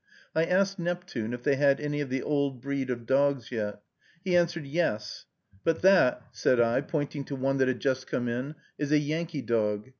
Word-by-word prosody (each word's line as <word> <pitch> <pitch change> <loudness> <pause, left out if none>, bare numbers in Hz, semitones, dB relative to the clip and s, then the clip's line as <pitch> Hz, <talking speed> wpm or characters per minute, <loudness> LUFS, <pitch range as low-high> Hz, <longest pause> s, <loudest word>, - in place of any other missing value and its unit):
I 160 +1 +3
asked 195 +2 +1
Neptune 175 -10 -3
if 120 0 -5
they 140 -2 +2
had 140 -1 +4
any 145 0 -2
of 140 - -3
the 130 0 -2
old 140 -3 0
breed 135 0 -3
of 120 -2 -3
dogs 135 -1 +1
yet. 105 -3 -3 0.4
He 185 -2 +1
answered, 170 -3 +2
"Yes." 135 -9 -2 0.4
"But 165 +1 0
that," 180 -10 +5
said 125 - +2
I, 115 0 +3
pointing 145 -2 -3
to 140 - -5
one 135 +1 0
that 130 - +4
had 130 -2 -1
just 130 -1 0
come 120 - -2
in, 125 +6 -3 0.2
"is 145 -1 -2
a 155 - +6
Yankee 155 0 -2
dog." 105 0 0
140 Hz, 200 wpm, -28 LUFS, 125-155 Hz, 0.4 s, a